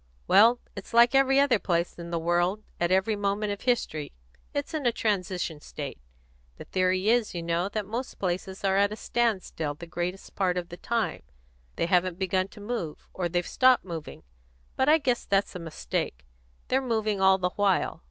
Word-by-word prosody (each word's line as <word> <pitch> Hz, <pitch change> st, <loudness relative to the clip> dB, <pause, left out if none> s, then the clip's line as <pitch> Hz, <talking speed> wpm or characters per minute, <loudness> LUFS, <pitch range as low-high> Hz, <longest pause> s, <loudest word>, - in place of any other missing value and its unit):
"Well, 235 Hz, +3 st, +6 dB, 0.2 s
it's 200 Hz, +3 st, -8 dB
like 235 Hz, +2 st, +7 dB
every 270 Hz, 0 st, +5 dB
other 275 Hz, -6 st, +4 dB
place 170 Hz, -2 st, -1 dB
in 170 Hz, 0 st, -7 dB
the 170 Hz, -, -1 dB
world, 175 Hz, +5 st, +1 dB, 0.2 s
at 175 Hz, -, +1 dB
every 190 Hz, +3 st, +2 dB
moment 205 Hz, +1 st, -1 dB
of 200 Hz, -, -9 dB
history 195 Hz, -, -1 dB, 0.4 s
it's 285 Hz, +2 st, -3 dB
in 300 Hz, -5 st, 0 dB
a -, -, +4 dB
transition 180 Hz, -8 st, -2 dB
state. 145 Hz, -2 st, -7 dB, 0.6 s
The -, -, -8 dB
theory 185 Hz, +2 st, +1 dB
is, 235 Hz, -4 st, +2 dB
you 170 Hz, -, -3 dB
know, 170 Hz, +3 st, 0 dB
that 210 Hz, 0 st, -3 dB
most 235 Hz, +6 st, -5 dB
places 190 Hz, +1 st, -3 dB
are 195 Hz, 0 st, +2 dB
at 200 Hz, +1 st, +3 dB
a -, -, -3 dB
standstill 195 Hz, -11 st, -1 dB
the 170 Hz, -, -9 dB
greatest 175 Hz, +3 st, -4 dB
part 185 Hz, -2 st, 0 dB
of 175 Hz, -1 st, -3 dB
the 175 Hz, -, -8 dB
time; 230 Hz, +4 st, -1 dB, 0.5 s
they -, -, 0 dB
haven't 180 Hz, 0 st, +2 dB
begun 185 Hz, 0 st, 0 dB
to 200 Hz, -, -15 dB
move, 205 Hz, -7 st, -5 dB
or 180 Hz, -2 st, -2 dB
they've 175 Hz, 0 st, 0 dB
stopped 255 Hz, -4 st, +4 dB
moving; 165 Hz, -4 st, -7 dB, 0.5 s
but 265 Hz, +2 st, +2 dB
I 310 Hz, -, +7 dB
guess 255 Hz, -6 st, 0 dB
that's 195 Hz, 0 st, +1 dB
a 180 Hz, -, -6 dB
mistake; 65 Hz, -, -4 dB, 0.4 s
they're 265 Hz, +1 st, +2 dB
moving 220 Hz, -5 st, -1 dB
all 190 Hz, 0 st, +6 dB
the 180 Hz, -1 st, 0 dB
while. 200 Hz, -2 st, +1 dB
190 Hz, 190 wpm, -27 LUFS, 175-225 Hz, 0.6 s, like